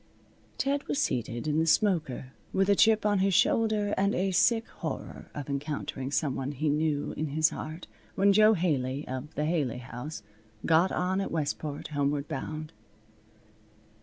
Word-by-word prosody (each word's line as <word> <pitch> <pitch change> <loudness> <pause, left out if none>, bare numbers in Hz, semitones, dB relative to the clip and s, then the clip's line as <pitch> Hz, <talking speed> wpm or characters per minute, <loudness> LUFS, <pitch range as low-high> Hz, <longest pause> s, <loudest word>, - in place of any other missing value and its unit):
Ted 280 +1 -1
was - - -1
seated 120 - -1
in 150 +1 +1
the 160 - +1
smoker, 155 - +1 0.2
with 190 0 +2
a 200 - +6
chip 220 0 +4
on 205 -2 +3
his 190 -1 +2
shoulder, 215 -1 +2
and 200 +1 +1
a 190 +1 +1
sick 225 +5 +3
horror - - -6
of 145 -2 -5
encountering 140 -2 -3
some 145 -1 0
one 135 +2 -3
he 150 +2 -1
knew 150 0 0
in 155 - -2
his 155 +2 +2
heart, 160 +3 -6 0.3
when 200 +1 +4
Jo 215 +2 +6
Haley, 145 -5 -1
of 130 +4 -6
the 150 - 0
Haley 150 -7 0
House, 125 +2 -7 0.4
got 165 +3 +4
on 185 +2 0
at 195 - -3
Westport, 150 -2 -3
homeward 145 0 -1
bound. 155 0 -5
155 Hz, 165 wpm, -29 LUFS, 140-195 Hz, 0.4 s, a